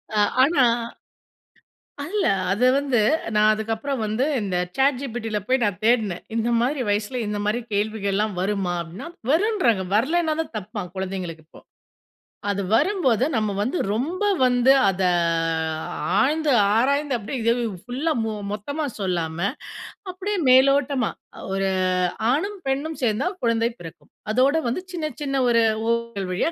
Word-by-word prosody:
அ -, -, +1 dB, 0.2 s
ஆனா 275 Hz, 0 st, +4 dB, 1.5 s
இல்லை 405 Hz, -, +1 dB, 0.2 s
அதை 210 Hz, +6 st, +2 dB
வந்து 275 Hz, -3 st, +1 dB, 0.4 s
நான் 210 Hz, 0 st, +4 dB
அதுக்கப்புறம் 225 Hz, +4 st, -2 dB
வந்து 215 Hz, +4 st, 0 dB, 0.2 s
இந்த 195 Hz, -4 st, -2 dB, 0.2 s
சாட்ஜிபிட்டில 245 Hz, -5 st, 0 dB
போய் 260 Hz, +1 st, +2 dB
நான் 200 Hz, -5 st, 0 dB
தேடினேன். 220 Hz, -6 st, +2 dB
இந்த 230 Hz, 0 st, 0 dB
மாரி 255 Hz, +3 st, 0 dB
வயசுல 205 Hz, +4 st, -1 dB
இந்த 210 Hz, 0 st, -2 dB
மாரி 215 Hz, +4 st, 0 dB
கேள்விகள்லாம் 205 Hz, 0 st, -1 dB
வருமா 190 Hz, -2 st, -1 dB
அப்படின்னா, 175 Hz, -, -8 dB, 0.2 s
வருன்றாங்க. 330 Hz, -, +2 dB
வரலைனா 315 Hz, +8 st, +2 dB
தான் 320 Hz, -, -5 dB
தப்பாம் 205 Hz, -3 st, -7 dB
குழந்தைங்களுக்கு 185 Hz, -4 st, -5 dB
இப்போ. -, -, -16 dB, 0.9 s
அது 200 Hz, 0 st, -1 dB
வரும்போது 260 Hz, -, +2 dB
நம்ம 215 Hz, -2 st, 0 dB
வந்து 260 Hz, +11 st, -1 dB, 0.2 s
ரொம்ப 315 Hz, -, -2 dB, 0.2 s
வந்து 250 Hz, +1 st, +4 dB, 0.2 s
அதை 190 Hz, -1 st, +1 dB, 1.1 s
ஆழ்ந்து 300 Hz, +1 st, +2 dB, 0.2 s
ஆராய்ந்து 280 Hz, +3 st, +1 dB
அப்படியே 225 Hz, +5 st, -5 dB
இதை 230 Hz, +1 st, +3 dB, 0.3 s
ஃபுல்லா 275 Hz, +7 st, -1 dB, 0.4 s
மொத்தமா 285 Hz, +10 st, -3 dB, 0.2 s
சொல்லாம 170 Hz, -4 st, -2 dB, 0.7 s
அப்படியே 395 Hz, +3 st, -3 dB
மேலோட்டமா, 265 Hz, -1 st, +4 dB, 0.4 s
ஒரு 195 Hz, 0 st, 0 dB, 0.6 s
ஆணும் 395 Hz, +8 st, -1 dB
பெண்ணும் 285 Hz, +4 st, -2 dB
சேர்ந்தால் 265 Hz, -, 0 dB
குழந்தை 230 Hz, 0 st, +2 dB
பிறக்கும், 165 Hz, -2 st, -12 dB, 0.2 s
அதோடு 265 Hz, +7 st, +3 dB
வந்து 250 Hz, +10 st, -2 dB
சின்ன, 310 Hz, -3 st, -3 dB
சின்ன 275 Hz, -1 st, 0 dB
ஒரு 230 Hz, -1 st, +4 dB, 0.3 s
ஊடல் 235 Hz, -5 st, -2 dB
வழியா. 205 Hz, -, 0 dB
235 Hz, 125 wpm, -23 LUFS, 205-280 Hz, 1.5 s, ஆனா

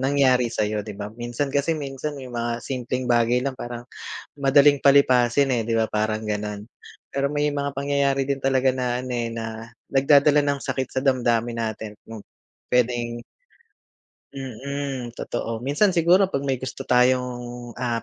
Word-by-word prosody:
nangyari 130 Hz, -2 st, +3 dB
sa'yo, 105 Hz, -2 st, -1 dB
'di 105 Hz, -1 st, -8 dB
ba? 105 Hz, +1 st, -6 dB
Minsan 120 Hz, +4 st, -3 dB
kasi 145 Hz, +4 st, +1 dB
minsan 145 Hz, 0 st, -5 dB
may 130 Hz, -2 st, -9 dB
mga 120 Hz, -1 st, -3 dB
simpleng 130 Hz, -1 st, -3 dB
bagay 120 Hz, +1 st, +2 dB
lang 140 Hz, -, -1 dB
parang 120 Hz, 0 st, -6 dB, 0.5 s
madaling 140 Hz, 0 st, +4 dB
palipasin, 135 Hz, -1 st, +5 dB
eh, 115 Hz, -, 0 dB
'di 115 Hz, 0 st, 0 dB
ba 110 Hz, -, +2 dB
parang 110 Hz, 0 st, -1 dB
gano'n. 105 Hz, -1 st, -3 dB, 0.5 s
Pero 140 Hz, +1 st, -1 dB
may 150 Hz, 0 st, +1 dB
mga 140 Hz, 0 st, -1 dB
pangyayari 140 Hz, -1 st, 0 dB
din 140 Hz, -1 st, -2 dB
talaga 130 Hz, -1 st, +2 dB
na 125 Hz, -1 st, -1 dB
ano, 130 Hz, 0 st, -5 dB
eh, 115 Hz, -1 st, -2 dB
na 115 Hz, 0 st, -6 dB, 0.2 s
nagdadala 145 Hz, +2 st, +5 dB
ng 140 Hz, -1 st, 0 dB
sakit 130 Hz, -1 st, -3 dB
sa -, -, 0 dB
damdamin 120 Hz, -3 st, +1 dB
natin 110 Hz, -2 st, -4 dB
kung 115 Hz, -1 st, -9 dB, 0.5 s
puwedeng 120 Hz, -1 st, 0 dB, 1.1 s
mm, 135 Hz, -1 st, -5 dB
totoo. 115 Hz, -1 st, -4 dB
Minsan 175 Hz, +8 st, +2 dB
siguro 175 Hz, +4 st, +5 dB
'pag 140 Hz, -7 st, -2 dB
may 135 Hz, -2 st, 0 dB
gusto 130 Hz, -3 st, -5 dB
tayong, 125 Hz, -1 st, +1 dB
ah, 120 Hz, -2 st, -1 dB
125 Hz, 155 wpm, -24 LUFS, 115-140 Hz, 1.1 s, palipasin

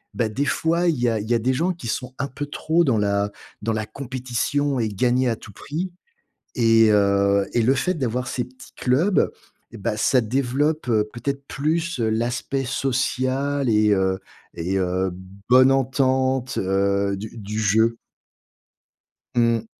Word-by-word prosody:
bah, 115 Hz, -3 st, 0 dB
des 135 Hz, +7 st, -1 dB
fois, 170 Hz, +4 st, +1 dB
il 160 Hz, -6 st, +1 dB
y 120 Hz, 0 st, +2 dB
a 110 Hz, -1 st, 0 dB
il 105 Hz, +2 st, -6 dB
y 120 Hz, -, +3 dB
a -, -, +2 dB
des 125 Hz, +3 st, +1 dB
gens 170 Hz, +7 st, 0 dB
qui 170 Hz, -7 st, -11 dB
sont 125 Hz, +3 st, -4 dB
un 140 Hz, -, -2 dB
peu 145 Hz, +2 st, -6 dB
trop 160 Hz, +3 st, +1 dB
dans 130 Hz, -8 st, +2 dB
la 100 Hz, 0 st, 0 dB, 0.3 s
dans 110 Hz, +2 st, -1 dB
la 110 Hz, 0 st, -2 dB
compétition 130 Hz, +3 st, -2 dB
et 115 Hz, -, +1 dB
gagner 125 Hz, +5 st, +1 dB
à 115 Hz, -, 0 dB
tout 110 Hz, -, -13 dB
prix 160 Hz, -, -5 dB, 0.7 s
et 115 Hz, -2 st, +5 dB
heu, 100 Hz, -1 st, +3 dB
et 120 Hz, -, +3 dB
le 125 Hz, +4 st, +4 dB
fait 180 Hz, +7 st, 0 dB
d'avoir 125 Hz, -3 st, -2 dB
ces 125 Hz, -1 st, -2 dB
petits 130 Hz, +1 st, -16 dB
clubs, 155 Hz, +11 st, +2 dB, 0.4 s
eh 115 Hz, -, -10 dB
bah, 105 Hz, +1 st, -2 dB
ça 125 Hz, +4 st, +3 dB
développe, 135 Hz, +6 st, 0 dB
heu, 110 Hz, -3 st, +2 dB
peut-être 140 Hz, +3 st, -4 dB
plus, 160 Hz, +1 st, -1 dB
heu, 115 Hz, -, +1 dB
l'aspect 120 Hz, +4 st, -1 dB
social 130 Hz, +1 st, -1 dB
et 105 Hz, -1 st, +3 dB
heu, 95 Hz, -1 st, +1 dB, 0.3 s
et 90 Hz, +3 st, -2 dB
heu, 95 Hz, 0 st, 0 dB, 0.4 s
bonne 130 Hz, +1 st, +7 dB
entente, 130 Hz, -1 st, +1 dB
heu, 100 Hz, +1 st, +1 dB
du 110 Hz, +3 st, -8 dB
du 105 Hz, 0 st, -4 dB
jeu. 110 Hz, +2 st, +2 dB, 1.4 s
Mmh. 115 Hz, -2 st, +2 dB
125 Hz, 170 wpm, -23 LUFS, 110-135 Hz, 1.4 s, bonne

